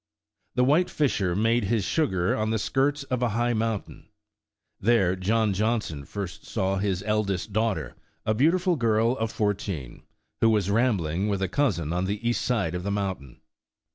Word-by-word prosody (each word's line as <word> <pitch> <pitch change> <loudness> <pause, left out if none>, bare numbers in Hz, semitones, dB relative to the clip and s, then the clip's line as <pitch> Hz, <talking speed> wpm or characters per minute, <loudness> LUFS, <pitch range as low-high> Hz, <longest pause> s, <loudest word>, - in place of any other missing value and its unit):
The 125 - +3
"White 150 +8 +3
Fisher" 100 - 0
made 115 +2 +2
his 110 0 +1
sugar 95 - +1
on 110 0 -1
the 110 - +1
skirts 140 +6 0
of 130 -2 -2
a 120 - +2
high 120 0 +1
mountain. 110 -2 -3 0.7
There 100 -4 +3
John 105 +3 +1
Johnson 105 -8 -1
first 100 -2 -6
saw 95 +1 -1
his 95 -1 -1
eldest 105 -2 -1
daughter, 105 - 0 0.3
a 110 - +2
beautiful 170 - +2
girl 115 -1 +2
of 115 -2 -2
fourteen, 95 - -3 0.4
who 115 - +4
was 105 -3 +1
rambling 100 -6 +1
with 100 -2 -1
a - - +1
cousin 90 - 0
on 90 +1 0
the 105 +4 -2
east 120 - +1
side 105 -10 0
of 90 - -3
the 100 - -3
moun 100 -2 -1
tain. 70 -3 -15
105 Hz, 170 wpm, -26 LUFS, 95-120 Hz, 0.7 s, who